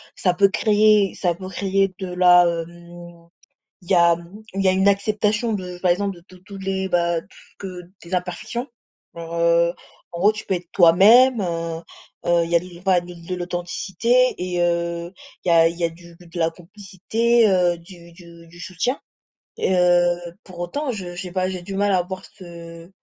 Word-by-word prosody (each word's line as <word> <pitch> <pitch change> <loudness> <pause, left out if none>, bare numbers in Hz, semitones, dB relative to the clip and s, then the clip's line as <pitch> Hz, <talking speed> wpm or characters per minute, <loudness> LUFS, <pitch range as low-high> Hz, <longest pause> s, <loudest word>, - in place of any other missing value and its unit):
ça 180 - +1
peut 200 +3 +4
créer 210 0 +3
ça 175 -3 -1
peut 185 +1 -8
créer 195 0 0
de 190 - -4
la, 180 -1 +6
hem 170 0 -7 0.5
il 180 +1 -15
y - - +5
a 170 -1 +5
mmh, 175 +6 -13
il 195 - -1
y 190 - +3
a - - +4
une 190 +2 +2
acceptation 210 +2 0
de 180 -2 -6
par 180 -1 +1
exemple 195 +2 0
de 170 - -15
tous 185 -1 -16
tous 195 +1 -11
les, 190 0 -3
bah 170 -1 +1
t - - -24 0.3
que 180 -3 -8 0.2
des 170 +2 -6
imperfections. 180 +8 -4 0.5
Alors, 170 0 -8
heu, 170 0 +3 0.4
en 170 - -6
gros 210 +3 +5
tu 215 - -8
peux 190 - 0
être 175 -1 -6
toi-même, 215 +8 +6
heu, 165 -2 -3 0.4
heu, 170 -1 +3
il 165 - -7
y 170 - +4
a - - +3
de 180 - -11
l 175 +1 -14
pas 190 -2 +3
de 175 0 -8
l'authenticité 180 +7 0
et 180 -1 -3
heu, 170 0 -1 0.3
il - - -3
y - - +4
a 165 -1 +6
il 170 - -7
y 175 - -5
a - - +2
du 170 +1 -16
de 170 0 -10
la 165 0 +1
complicité, 205 +6 0
heu, 180 -2 +2
du 170 -1 -15
du 170 -1 -15
du 170 +1 -16
soutien. 185 +10 -2 0.6
Heu, 175 -1 +3 0.3
pour 185 -2 -14
autant, 260 - -3
je 180 -6 -7
je 180 - -5
sais 180 -2 -7
pas, 185 0 -1
j'ai 185 -1 -5
du 195 +2 -7
mal 205 +1 +1
à 180 - +3
voir 185 +1 -7
ce 170 -1 -12
180 Hz, 205 wpm, -21 LUFS, 170-195 Hz, 0.6 s, la